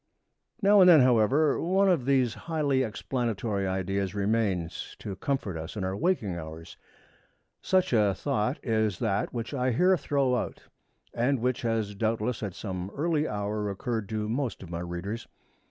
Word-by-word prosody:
Now 200 0 +7
and 180 - +8
then, 160 -5 +8
however, 130 +5 +3
one 190 +3 +2
of 170 -10 +2
these 130 -4 +2
highly 150 -5 0
explanatory 110 -4 -2
ideas 95 +1 -2
remains 100 -5 -1
to 100 - -6
comfort 100 -5 -2
us 80 +5 -7
in 100 - -2
our 95 +1 -2
waking 125 - 0
hours. 80 +1 -8 0.9
Such 185 -7 +2
a 105 -4 +3
thought 110 +8 -1
is 110 -5 +1
that 105 -4 -1
which 115 +2 -5
I 130 -2 0
here 180 +10 +4
throw 140 -3 +1
out, - - -4 0.5
and 130 +4 +1
which 125 +1 0
has 115 -3 -1
doubtless 110 +2 -1
at 100 -4 -4
some 95 -3 -5
early 155 0 +1
hour 105 0 -2
occurred 110 +1 -3
to 110 -1 -2
most 120 -2 -2
of 85 - -10
my 85 - -3
readers. 90 +6 -5
110 Hz, 160 wpm, -28 LUFS, 100-135 Hz, 0.9 s, and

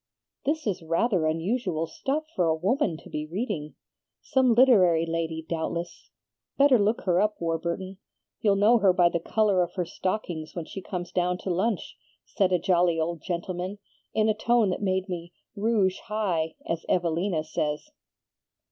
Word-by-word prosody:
"'This 310 +2 0
is 190 -4 -1
rather 165 +1 +1
unusual 165 +1 -1
stuff 280 - -2
for 180 - +2
a 160 - +3
woman 190 - 0
to - - -14
be 150 0 -4
reading. 170 -4 -4 0.4
Some 255 -3 +2
literary 185 -10 +5
lady 165 -1 -3
doubtless. 170 +1 -4 0.5
Better 275 -3 +6
look 210 +3 +1
her 180 -1 +2
up, 210 0 0
Warburton. 170 +3 -3 0.4
You'll 205 -2 +3
know 215 +4 +5
her 195 -3 +4
by 175 -1 +4
the 170 - -1
color 205 +1 +2
of 175 0 -2
her 180 -2 -1
stockings 175 -4 -4
when 170 -3 -4
she 195 - -7
comes 175 -1 -5
down 180 0 0
to 190 - -1
lunch,' 195 +3 -1 0.3
said 195 -3 +1
a 180 - +4
jolly 175 -1 +2
old 165 0 -2
gentlenoan, 180 +2 -4 0.3
in 215 0 +2
a 215 - +3
tone 225 -1 +2
that 180 - -3
made 190 -1 0
me 175 -2 -6 0.2
'rouge 205 -3 +1
high,' 180 -7 -1
as 165 0 -2
Evelina 170 -1 +1
says. 150 - -3
180 Hz, 165 wpm, -27 LUFS, 165-210 Hz, 0.5 s, Better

